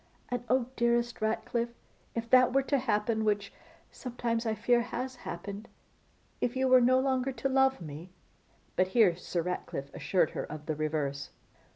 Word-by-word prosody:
And 245 -1 -2
oh! 255 0 +3
dearest 235 0 +1
Ratcliffe, 235 +2 -1 0.4
if 230 0 -2
that 255 0 +7
were 275 0 +3
to 280 0 +1
happen, 220 -2 0
which 205 -2 0 0.4
sometimes 235 -2 -3
I 220 - 0
fear 240 +2 +3
has 250 +2 -4
happened, 200 +1 -7 0.7
if 240 - 0
you 260 0 +2
were 255 0 +7
no 255 +1 +5
longer 260 0 +1
to 270 - -2
love 265 0 +3
me 160 +3 -8 0.3
' - - -36
But 185 - +3
here 200 -7 +6
Sir 175 -1 -3
Ratcliffe 160 -5 -4
assured 180 -5 +1
her - - -3
of 150 0 -8
the 155 - -1
reverse. 145 -2 -2
230 Hz, 170 wpm, -30 LUFS, 185-255 Hz, 0.7 s, that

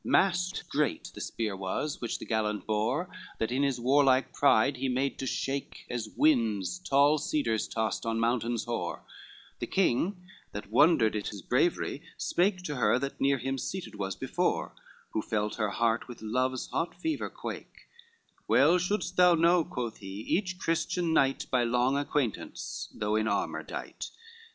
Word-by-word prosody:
XVII - - -6
Mast 180 -1 +2
great 150 -2 -1
the - - -8
spear 110 -3 -3
was 95 +10 -3
which 120 - -2
the - - -8
gallant 105 -2 -1
bore 110 +11 0 0.3
That 110 - -1
in 130 +2 +1
his 135 -3 +1
warlike 135 +1 +3
pride 140 -1 +4
he 130 +1 -1
made 130 +2 -1
to 135 - -3
shake, 135 +2 -3
As 115 -3 -3
winds 115 - +2
tall 145 -2 +4
cedars 120 -7 0
toss 110 -2 -2
on 115 0 -1
mountains 120 0 0
hoar: 120 -1 -3 0.6
The - - -3
king, 185 +2 +1 0.3
that 105 0 -7
wondered 130 -4 +5
at 105 - -2
his 100 -3 -6
bravery, - - +1 0.2
spake 180 +1 +1
To 150 -5 -3
her, 125 - +3
that 140 +2 -4
near 140 0 +3
him 135 +2 -2
seated 180 - -5
was 95 -2 -3
before, - - -1 0.4
Who 110 - -1
felt 105 -1 -2
her 110 -2 0
heart 115 +3 0
with 120 -3 -10
love's 130 +3 0
hot 170 - -1
fever 320 -2 -2
quake, - - -8 0.6
"Well 180 - +5
shouldst 180 0 -1
thou 180 -1 +7
know," 170 +1 +4
quoth 120 -6 -4
he, 95 +1 -7
"each 185 - -1
Christian 165 -1 0
knight, 135 -3 +2
By 125 -2 +3
long 125 +3 +2
acquaintance, 140 -5 -2
though 105 0 -1
in 110 0 +1
armor - - -1
dight. - - -6
130 Hz, 165 wpm, -29 LUFS, 110-155 Hz, 0.6 s, thou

